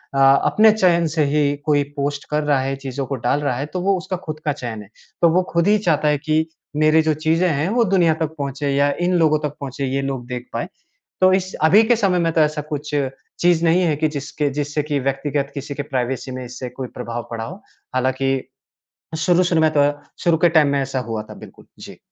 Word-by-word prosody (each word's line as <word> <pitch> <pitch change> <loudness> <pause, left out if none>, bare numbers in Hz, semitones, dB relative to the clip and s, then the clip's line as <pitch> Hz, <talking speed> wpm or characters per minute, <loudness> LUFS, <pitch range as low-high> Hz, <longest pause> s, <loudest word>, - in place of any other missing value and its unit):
अ, - - +1
अपने 140 +11 +5
चयन 175 -5 +3
से 155 -2 +2
ही 145 -1 +2
कोई 145 -2 +3
पोस्ट 145 0 -3
कर 150 0 0
रहा 145 -2 +2
है, 135 +1 -2
चीज़ों 135 0 -5
को 135 - -3
डाल 140 - +2
रहा 135 -4 0
है, 140 - -2
तो 180 +4 -5
वो 195 0 +2
उसका 185 0 -4
खुद 155 -1 -5
का 150 - +2
चयन 120 -6 -6
है। 100 - -14 0.3
तो 170 - +6
वो 180 +3 +3
खुद 170 +3 +1
ही 210 - +5
चाहता 165 -7 +1
है 150 -1 +3
कि 155 +1 0 0.3
मेरी 155 +1 +4
जो 155 0 +1
चीज़े 160 +4 +1
हैं, 150 +1 0
वो 235 +3 +2
दुनिया 180 -6 +3
तक 160 0 -2
पहुँचे 140 0 -3
या 145 0 +3 0.2
इन 180 - +1
लोगों 155 -2 +3
तक 145 - -10
पहुँचे, 135 0 -4
ये 135 +1 -1
लोग 135 -3 -4
देख 125 0 -6
पाएँ। - - -2 0.5
तो 185 0 +6
इस 190 0 0
अभी 195 +8 +6
के 240 +2 +3
समय 195 -5 +1
में 165 -1 +1
तो 160 - +3
ऐसा 150 0 +1
कुछ 150 0 -4 0.5
चीज़ 175 -1 +3
नहीं 170 +3 +4
है 160 -4 +2
कि 155 +2 +1
जिसके 145 +1 -2
जिससे 150 +1 -1
कि 145 -1 -1
व्यक्तिगत 135 +1 -2
किसी 140 0 -5
के 145 - -3
प्राइवेसी 130 -1 -3
में 130 0 -5
इससे 125 +1 -7
कोई 130 0 -6
प्रभाव 120 -1 -5
पड़ा 115 -1 -4
हो, 185 - -8 0.3
हालाँकि 130 +1 +1 0.9
शुरू-शुरू 175 0 +2
में 155 - +4
तो, 145 0 +4 0.3
शुरू 170 -2 +4
के - - +6
टाइम 160 -3 +4
में 140 0 +1
ऐसा 135 -1 -3
हुआ 110 -1 -2
था, - - -12
बिल्कुल। - - -14
जी। - - -11
150 Hz, 230 wpm, -20 LUFS, 135-170 Hz, 0.9 s, तो